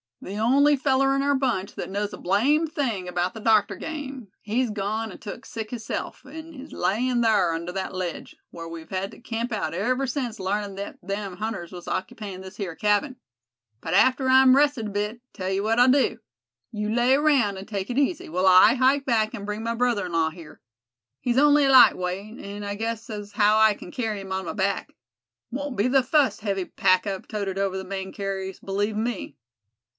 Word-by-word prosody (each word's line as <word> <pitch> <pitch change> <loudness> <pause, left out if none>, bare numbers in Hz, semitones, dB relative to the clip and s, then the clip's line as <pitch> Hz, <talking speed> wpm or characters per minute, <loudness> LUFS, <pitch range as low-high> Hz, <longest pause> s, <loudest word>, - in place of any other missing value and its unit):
"The 195 +2 -6
only 275 +7 +4
feller 270 0 +2
in 275 - +1
our 285 0 +2
bunch 240 -7 -1
thet - - -6
knows 205 +2 -3
a - - -6
blamed 290 - +1
thing 225 - -2
about 180 +1 -1
the - - -6
doctor 215 -2 +3
game, 275 -7 -6
he's 235 +4 0
gone 215 +2 -3
an' - - -10
took 230 +4 -8
sick 220 -2 -6
hisself, 230 -3 -5
an' 320 +4 -10
is 275 +2 -10
alyin' 240 +6 +1
thar 200 -7 +3
under 170 +2 -4
thet 190 +1 -4
ledge, 185 -2 -5 0.2
whar 165 -1 -8
we've 165 -1 -9
hed 190 +1 -3
to - - -14
camp 235 0 -4
out 215 -6 -2
ever 255 +8 0
since 245 -4 -3
larnin' 200 +1 -2
thet 200 +1 -6
them 195 -1 -4
hunters 205 -5 -4
was 175 -2 -10
occupyin' 190 0 -4
this 190 0 -11
here 185 -6 -4
cabin. 210 - +1 0.6
But 165 +6 -2
after 260 +4 +4
I'm 260 0 +7
rested 285 -6 +2
a - - -6
bit, 210 +3 -3
tell 185 -1 -4
you 195 +1 0
what 225 +2 +1
I'll 250 +1 +6
do—you 220 -5 -3
lay 245 +2 +3
around 270 -9 +3
and 190 - -8
take 200 -1 -4
it 245 - -3
easy, 285 - 0
while 180 +4 +1
I 185 +6 +7
hike 265 +2 +3
back 220 -3 +1
and 200 -3 -7
bring 210 +1 -4
my 230 0 -1
brother 235 -5 +1
in 175 - -8
law 165 -1 +2
here. 165 -2 -13 0.6
He's 245 0 -1
on'y 290 0 +5
a 270 - +3
light 260 - +8
weight, 195 +5 -5
an' 205 +1 -7
I 200 0 -3
guess 225 +1 -4
as 205 -1 -6
how 210 0 +4
I 220 -1 +6
kin 180 - -11
kerry 220 -5 -3
him 190 -1 -9
on 190 0 -2
my - - -4
back. 200 -1 -1 0.6
Won't 280 +1 -4
be 205 +4 +2
the 265 0 +3
fust 275 -2 +2
heavy 195 -3 -1
pack 185 +1 +2
I've 195 -1 -4
toted 200 -3 -3
over 195 -1 0
the 190 - -4
Maine 190 0 -5
carries, 195 -1 -4
believe 205 +2 -2
me." 225 -2 -3
210 Hz, 210 wpm, -25 LUFS, 195-255 Hz, 0.6 s, light